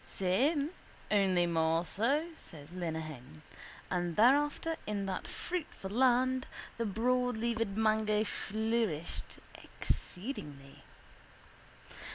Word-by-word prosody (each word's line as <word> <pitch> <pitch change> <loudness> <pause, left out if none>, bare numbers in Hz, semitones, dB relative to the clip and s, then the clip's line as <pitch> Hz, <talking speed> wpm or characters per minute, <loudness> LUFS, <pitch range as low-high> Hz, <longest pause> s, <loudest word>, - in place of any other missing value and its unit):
—Same 280 - +1 0.4
only 190 -4 +4
more 165 0 +2
so, 265 - +1
says 155 - -12
Lenehan. 155 - -5 0.5
And 175 -2 0
thereafter 290 +7 +4
in 205 -2 -1
that 190 -1 -3
fruitful 320 - -4
land 255 +2 +3 0.3
the 230 - +1
broadleaved 230 -1 0
mango 215 -1 +3
flourished 220 -6 -2 0.2
exceedingly. 150 - -5
210 Hz, 85 wpm, -33 LUFS, 175-250 Hz, 0.5 s, only